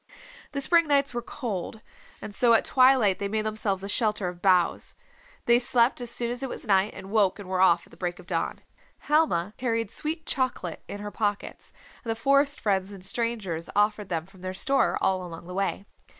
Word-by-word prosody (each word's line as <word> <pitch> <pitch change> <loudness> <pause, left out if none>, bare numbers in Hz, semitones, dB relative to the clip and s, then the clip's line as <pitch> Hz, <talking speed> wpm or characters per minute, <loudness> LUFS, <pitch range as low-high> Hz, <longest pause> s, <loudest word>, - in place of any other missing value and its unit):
The 280 - -1
spring 335 +3 +4
nights 280 -2 +2
were 240 - -2
cold, 220 -5 -5 0.4
and 205 - -7
so 235 +2 +4
at 225 - +4
twilight 255 -7 +4
they 200 - -2
made 215 +1 -2
themselves 210 -3 -2
a - - -4
shelter 210 -2 0
of 175 0 -11
boughs. 180 -3 +2 0.5
They 240 0 +5
slept 245 0 +2
as 240 - -5
soon 235 0 -1
as 245 +1 -5
it 270 - -3
was - - -7
night 195 -1 +2
and 190 0 -9
woke 205 -4 +3
and 200 -3 -9
were 185 0 0
off 170 -2 +4
at - - -23
the - - -16
break 175 -1 -3
of - - -13
dawn. 170 -1 -2 0.4
Helma 250 - +1
carried 230 -4 -1
sweet 315 +1 -3
chocolate 255 -10 -2
in 205 - -7
her 205 0 -6
pockets, 205 -2 -3 0.3
and 225 -2 -3
forest 280 +3 +3
friends 195 -2 0
and 195 -2 -10
strangers 205 -8 -2
offered 210 -1 +1
them 165 -2 -2
from 190 0 -19
their 185 0 -5
store 275 +8 +1
all 185 -1 +1
along 170 -1 -9
the 180 - -8
way. 195 +1 -2
210 Hz, 205 wpm, -26 LUFS, 190-245 Hz, 0.5 s, They